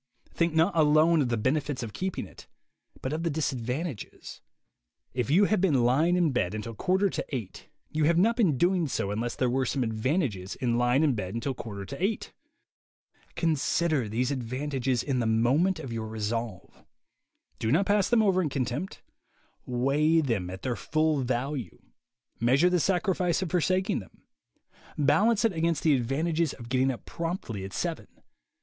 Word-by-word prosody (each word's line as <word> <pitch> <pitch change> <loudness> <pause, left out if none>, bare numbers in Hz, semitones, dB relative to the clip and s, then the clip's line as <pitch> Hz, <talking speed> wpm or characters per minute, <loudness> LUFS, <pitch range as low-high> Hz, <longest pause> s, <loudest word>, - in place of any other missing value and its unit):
Think 170 -1 0
not 165 +4 +3
alone 155 +1 +4
of 130 - 0
the 120 - 0
benefits 135 +3 -1
of 110 - -6
keeping 190 0 -3
it, - - -15 0.6
but 130 - -2
of 160 - -2
the 170 - 0
disad 145 -5 -2
vantages. 130 - -5 0.7
If 125 -3 -2
you 185 +8 +5
have 210 -2 +1
been 145 -10 +3
lying 150 +9 +3
in 175 -4 +2
bed 105 -6 -1
until 110 +2 -5
quarter 190 - +1
to - - -3
eight, 120 -9 -6 0.2
you 155 -1 +1
have 165 +2 +3
not 225 +6 +4
been 190 - +2
doing 175 +1 +2
so 100 -6 -2
unless 115 +3 -2
there 130 - +1
were 130 +2 +1
some 130 +1 -1
advantages 110 - -1
in 120 -2 0
lying 125 +4 +3
in 145 -4 +3
bed 100 -2 -4
until 120 +4 -2
quarter 100 -5 -7
to 140 - -6
eight. 210 +3 -1 1.0
Consider 155 - +1
these 125 +5 0
advantages 130 0 -2
in 135 -3 -1
the 115 - 0
moment 135 +11 +2
of 135 -7 -6
your 110 -1 -4
resolve. 110 -1 -4 0.8
Do 110 - 0
not 175 +8 +3
pass 205 -1 +2
them 235 -2 +4
over 190 -3 +3
in 160 - -1
contempt. 135 +7 -3 0.6
Weigh 140 +6 +2
them 115 - -1
at 95 +1 -8
their 125 -2 -1
full 155 0 0
value. 130 +1 -3 0.6
Measure 135 +10 +3
the 180 - +3
sacrifice 180 0 +1
of 175 - -5
forsaking 185 +3 +1
them. 95 - -15 0.7
Balance 200 - +3
it 225 - +2
against 165 -1 0
the 155 - +4
advantages 155 +6 0
of 120 -2 -11
getting 130 +1 +2
up 125 - -5
promptly 165 - -4
at 95 - -7
seven. - - -3
140 Hz, 175 wpm, -28 LUFS, 120-170 Hz, 1.0 s, you